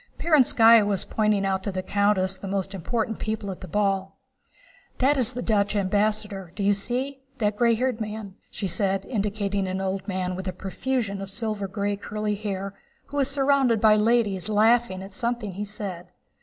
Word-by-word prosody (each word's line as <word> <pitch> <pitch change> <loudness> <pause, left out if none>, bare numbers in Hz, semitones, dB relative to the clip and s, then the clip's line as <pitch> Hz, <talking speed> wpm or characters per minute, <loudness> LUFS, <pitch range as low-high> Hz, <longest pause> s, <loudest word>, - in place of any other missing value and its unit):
Perónskaya 235 -8 +6
was 205 -2 -1
pointing 210 -2 +1
out 190 -1 0
to 200 - -3
the 185 0 -3
countess 200 -1 +1
the 190 +1 -8
most 195 0 -2
important 220 +4 -2
people 215 -2 -3
at 185 - -9
the 185 - -7
ball. 195 +1 0 0.8
"That 275 +3 +3
is 255 -2 +2
the 245 0 -4
Dutch 205 -2 +1
ambassador, 205 -1 0
do 205 - -3
you 205 +1 +4
see? 255 +7 -3 0.2
That 210 -3 0
gray 235 +1 +3
haired 250 -1 -1
man," 215 -2 -5 0.2
she 205 - -5
said, 195 +1 0
indicating 200 -3 -1
an 185 +1 -2
old 190 0 -3
man 185 -2 -2
with 190 +1 -6
a 185 - -2
profusion 200 +2 -2
of 195 - -5
silver 210 -1 -3
gray 200 +1 -2
curly 210 +1 -3
hair, 200 -1 -4 0.4
who 290 - -5
was 275 -1 +3
surrounded 275 -4 +3
by 215 0 +6
ladies 215 -3 +2
laughing 215 -2 +3
at 195 0 -10
something 235 -2 -2
he 200 +3 -4
said. 195 -4 -6
205 Hz, 185 wpm, -25 LUFS, 195-225 Hz, 0.8 s, Perónskaya